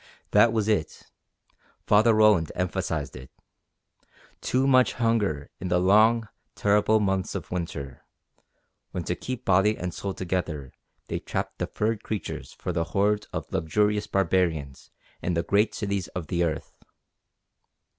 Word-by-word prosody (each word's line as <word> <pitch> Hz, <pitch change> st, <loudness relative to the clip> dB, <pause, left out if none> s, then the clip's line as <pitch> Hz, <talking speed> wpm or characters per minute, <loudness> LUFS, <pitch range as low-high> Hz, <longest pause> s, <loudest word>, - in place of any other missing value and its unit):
That 110 Hz, +3 st, +6 dB
was 110 Hz, -2 st, 0 dB
it! 105 Hz, -8 st, -2 dB, 0.7 s
Father 110 Hz, +2 st, +5 dB
Roland 105 Hz, -7 st, +4 dB
emphasized 90 Hz, -2 st, -2 dB
it. 65 Hz, 0 st, -10 dB, 1.1 s
Too 130 Hz, +1 st, +1 dB
much 130 Hz, -2 st, +4 dB
hunger 105 Hz, -, 0 dB
in 95 Hz, -, -4 dB
the 90 Hz, 0 st, +2 dB
long, 110 Hz, +5 st, +4 dB, 0.3 s
terrible 105 Hz, +1 st, +3 dB
months 95 Hz, -2 st, -1 dB
of -, -, -6 dB
winter, 80 Hz, -7 st, -5 dB, 0.9 s
when 90 Hz, -2 st, -3 dB
to 90 Hz, -, -2 dB
keep 125 Hz, +6 st, -6 dB
body 95 Hz, +3 st, +3 dB
and 90 Hz, -1 st, -4 dB
soul 100 Hz, -1 st, -4 dB
together 80 Hz, -7 st, -3 dB, 0.4 s
they -, -, -3 dB
trapped -, -, -4 dB
the -, -, -1 dB
furred 110 Hz, 0 st, -1 dB
creatures 110 Hz, -3 st, -5 dB
for 90 Hz, -, -5 dB
the 85 Hz, 0 st, 0 dB
hordes 105 Hz, +1 st, +2 dB
of -, -, -5 dB
luxurious 105 Hz, +5 st, +1 dB
barbarians 85 Hz, -7 st, 0 dB, 0.3 s
in 90 Hz, -, -1 dB
the 85 Hz, -, +1 dB
great 105 Hz, +4 st, +2 dB
cities 100 Hz, -4 st, -2 dB
of 90 Hz, -3 st, -6 dB
the 85 Hz, 0 st, +1 dB
earth. 80 Hz, -2 st, -4 dB
95 Hz, 140 wpm, -26 LUFS, 85-110 Hz, 1.1 s, That